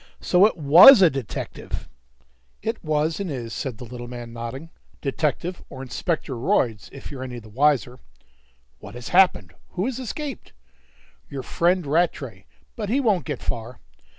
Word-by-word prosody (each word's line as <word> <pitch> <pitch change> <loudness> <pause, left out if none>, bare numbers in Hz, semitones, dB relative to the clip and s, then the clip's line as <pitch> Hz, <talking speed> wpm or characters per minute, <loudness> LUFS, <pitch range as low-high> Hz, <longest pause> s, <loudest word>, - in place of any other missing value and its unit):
"So 185 +3 +5
it 220 - -5
was 170 - +9
a 170 - +6
detective!" 135 -4 -6 0.8
"It - - -3
was 155 +2 0
and 195 -3 -3
is," 120 -5 -5
said 130 -5 -4
the 125 - -9
little 120 +1 -8
man, 120 -1 -8
nodding. 120 +8 -7 0.3
"Detective 155 +5 -2
or 130 -1 -8
Inspector 150 +2 -3
Royds, 115 -2 0
if 140 - -10
you're 135 -3 -7
any 125 -2 -6
the 110 -2 -11
wiser. 125 0 +1 0.8
"What - - -11
has 120 -1 -7
happened? 185 0 +3 0.2
Who 185 +2 -1
has 260 0 -3
escaped?" 275 +3 -6 0.8
"Your 135 -2 -6
friend 175 0 +1
Rattray; 140 - -1 0.3
but 210 -3 -4
he 255 +5 +2
won't 215 -9 +1
get 150 - -5
far." 120 +1 -5
140 Hz, 155 wpm, -23 LUFS, 125-180 Hz, 0.8 s, was